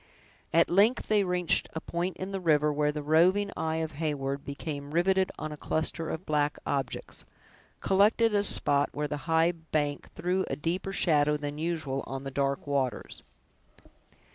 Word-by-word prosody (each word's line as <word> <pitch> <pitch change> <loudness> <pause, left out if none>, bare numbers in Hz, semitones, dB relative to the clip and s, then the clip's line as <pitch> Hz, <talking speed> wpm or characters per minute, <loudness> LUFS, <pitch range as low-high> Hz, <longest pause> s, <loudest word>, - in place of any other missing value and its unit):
At 165 +1 +4
length 210 +7 +3
they 210 -2 +4
reached 180 -2 +1
a 160 - -3
point 175 +3 -3
in 185 +1 -5
the 195 - -3
river 150 -4 +2
where 150 0 +1
the 150 0 -5
roving 180 +7 +3
eye 160 0 -1
of 160 -1 -2
Heyward 140 -2 -3
became 140 0 -6
riveted 190 +2 +2
on 155 - -5
a 150 - -7
cluster 160 +2 -2
of 160 +4 -5
black 150 -1 0
objects, 135 -4 -3 0.6
collected 210 +3 +3
at 205 - +3
a - - 0
spot 145 -7 +4
where 150 0 -2
the 150 - -3
high 165 +1 +4
bank 155 -3 -3
threw 180 +3 0
a - - -1
deeper 180 +5 -3
shadow 150 -5 +2
than 145 0 -5
usual 155 -5 -2
on 135 0 -5
the 135 - -5
dark 140 0 -1
waters. 135 -5 -2
160 Hz, 170 wpm, -28 LUFS, 145-180 Hz, 0.6 s, At